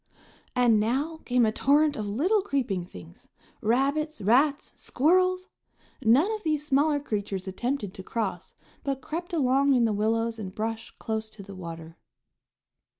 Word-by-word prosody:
And 240 -3 +4
now 270 +9 0
came 245 -1 +3
a 215 - +2
torrent 290 +5 +3
of 210 -1 -4
little 340 - +2
creeping 245 - -1
things: 85 - -13 0.3
rabbits, 280 +7 +1
rats, 275 +8 +2
squirrels! 365 +6 +2 0.5
None 270 - +4
of 435 -1 -3
these 305 -4 -1
smaller 290 +1 +2
creatures 205 -7 -4
attempted 225 +1 -3
to - - -8
cross, 225 +4 -4 0.3
but 275 -1 -2
crept 345 +4 -5
along 275 -3 +3
in 240 -2 +4
the 220 - +1
willows 225 +2 0
and 190 -2 -7
brush 225 +1 -3
close 220 0 -3
to 215 -2 -11
the 200 0 -10
water. 165 -2 -9
245 Hz, 150 wpm, -27 LUFS, 215-295 Hz, 0.5 s, And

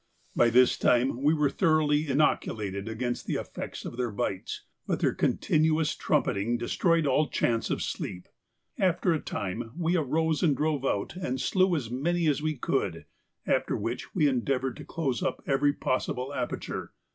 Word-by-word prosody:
By 120 - +5
this 125 +2 +4
time 125 +1 +2
we 145 +2 +4
were 150 -3 +2
thoroughly 155 -3 +2
inoculated 110 -8 0
against 120 +2 -3
the - - -1
effects - - -6
of - - -6
their 125 -1 0
bites, 100 -2 -3 0.2
but - - 0
their - - +2
continuous 155 0 +2
trumpeting 110 +5 0
destroyed 165 +7 +1
all 150 +2 +3
chance 115 -1 0
of - - -1
sleep; 90 -2 -5 0.5
after 180 -1 +2
a 155 - 0
time 110 +2 -4
we 170 0 +1
arose 160 0 +1
and 150 -7 +3
drove 150 -3 0
out 100 - -1
and 130 -8 -3
slew 185 -2 +2
as 120 -7 -3
many 170 +7 0
as 150 -1 +2
we 155 -1 -1
could, - - -1 0.4
after - - +1
which - - -4
we 150 - +4
endeavoured 130 0 0
to - - -9
close 135 -7 -2
up - - -2
every 140 +1 +3
possible 130 -1 -2
aperture. 125 -3 -4
140 Hz, 165 wpm, -28 LUFS, 120-155 Hz, 0.5 s, By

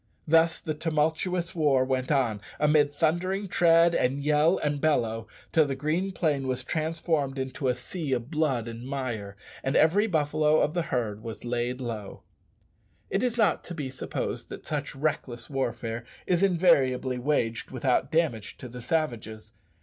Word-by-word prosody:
Thus 160 +1 +4
the 155 - -3
tumultuous 160 +3 0
war 145 -6 +3
went 130 0 -1
on, 120 -8 +1 0.2
amid 150 -1 +4
thundering 175 +6 0
tread, 170 -1 +5
and 135 0 +1
yell, 150 +4 +3
and 145 -1 -1
bellow, 115 -8 +1 0.2
till 160 -2 +4
the 135 - -2
green 160 +8 -1
plain 145 -7 0
was 130 0 -1
transformed 155 -2 -1
into 130 +1 -3
a 125 - +2
sea 145 +4 -5
of 125 +3 -3
blood 145 -7 0
and 115 +1 -7
mire, 120 -7 -4 0.3
and 135 - -1
every 195 +8 +4
buffalo 155 -3 +2
of 150 - +1
the 175 - +1
herd 110 -4 -1
was 115 +1 -7
laid 120 +1 -1
low. 110 -5 -6 0.9
It - - +1
is 245 -1 0
not 210 -7 +2
to 175 - -6
be 140 -5 -4
supposed 130 - -4
that - - -9
such 150 -1 -3
reckless 135 -4 -2
warfare 120 -3 -2 0.2
is 180 -1 +1
invariably 140 -9 +3
waged 120 -4 0
without 130 +3 0
damage 155 -11 0
to 125 - -8
the 125 +1 -9
savages. 115 -7 -3
145 Hz, 160 wpm, -27 LUFS, 125-160 Hz, 0.9 s, tread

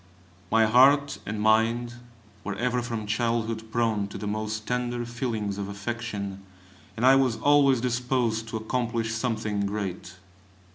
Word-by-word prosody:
My 115 0 +5
heart 135 +5 +5
and 105 +1 -3
mind 115 +3 +2 0.5
were 105 - -4
ever 125 +3 0
from 115 -3 -4
childhood 115 0 -1
prone 115 -4 0
to 100 - -8
the - - -6
most 110 +1 -3
tender 120 -1 -2
feelings 115 -4 -3
of 100 0 -4
affection, 100 -2 -5 0.6
and 120 - +1
I 135 +1 +7
was 130 -4 +2
always 140 -4 +4
disposed 120 -2 0
to 110 - -3
accomplish 115 0 -2
something 110 -3 -1
great. 95 -4 -5
115 Hz, 140 wpm, -26 LUFS, 105-120 Hz, 0.6 s, I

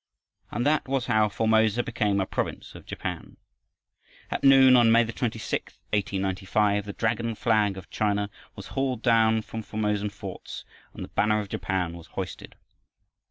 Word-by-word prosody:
And 120 - -2
that 150 -1 +2
was 135 -2 0
how 110 -2 +3
Formosa 110 +2 +2
became 105 -4 0
a 95 - +1
province - - -4
of - - -13
Japan. - - -6 0.9
At - - -3
noon 135 -1 +7
on 120 -2 +6
May 115 +1 +5
26, 115 -1 -3 0.2
1895, 100 +1 0
the 100 - -5
dragon 115 +1 -1
flag 105 -3 +1
of 95 - -11
China 105 -1 0 0.2
was - - -9
hauled 130 -4 -2
down 110 -2 +3
from 110 - -6
Formosan 105 -1 -1
forts 100 -2 -8 0.3
and - - -6
the - - -8
banner 105 0 +2
of 105 -2 -5
Japan 90 -4 -2
was 85 -1 -12
hoisted. - - -7
110 Hz, 155 wpm, -26 LUFS, 100-115 Hz, 0.9 s, noon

